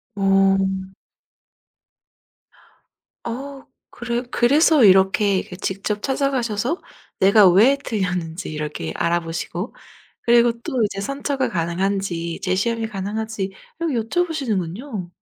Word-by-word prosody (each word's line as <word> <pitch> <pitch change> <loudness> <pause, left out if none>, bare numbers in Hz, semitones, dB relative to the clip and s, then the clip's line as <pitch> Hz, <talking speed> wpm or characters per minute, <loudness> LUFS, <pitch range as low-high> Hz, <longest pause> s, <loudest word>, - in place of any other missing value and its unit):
어. 195 -1 +3 2.7
어 270 +3 -6 0.2
그래 240 0 -3
그래서 285 +3 +4
이렇게 195 0 +5
이렇게 180 - -8
직접 195 +2 -3
찾아가셔서 265 - -1 0.4
내가 200 0 +6
왜 225 +10 +5
틀렸는지 180 -5 -3
이렇게 150 - -4
알아 170 +1 +1
보시고 170 +4 -5 0.5
그리고 235 0 +4
또 245 -1 -1
이제 200 -1 -2
선처가 275 +4 -2
가능한지, 170 -1 -2
재시험이 225 +5 0
가능한지 215 +1 -4 0.4
이걸 335 - -1
여쭤 255 +8 0
보시는군요. 215 - -3
205 Hz, 255 characters per minute, -21 LUFS, 185-240 Hz, 2.7 s, 내가